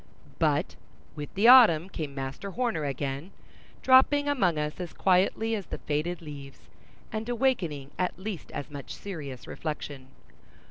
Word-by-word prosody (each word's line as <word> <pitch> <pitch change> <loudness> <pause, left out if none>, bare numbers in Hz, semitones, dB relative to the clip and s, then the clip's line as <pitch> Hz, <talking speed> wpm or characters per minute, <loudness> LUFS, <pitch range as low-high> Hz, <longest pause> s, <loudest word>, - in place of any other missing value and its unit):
But - - +1 0.4
with 145 -2 -6
the 205 +4 +4
autumn 220 -10 +8
came 150 -7 -6
Master 135 +8 -5
Horner 225 -8 -1
again, 140 +3 -3 0.5
dropping 275 +3 +5
among 195 - +2
us 150 +2 -3
as 180 -2 -5
quietly 195 +4 +2
as 205 -5 -3
the - - -5
faded 165 +4 -2
leaves, 140 -3 -10 0.5
and 220 +2 -4
awakening 185 - 0
at 180 - -1
least 190 -2 -6
as 145 - -6
much 140 -2 -7
serious 145 -10 -7
reflection. 145 -4 -6
170 Hz, 140 wpm, -28 LUFS, 145-220 Hz, 0.5 s, autumn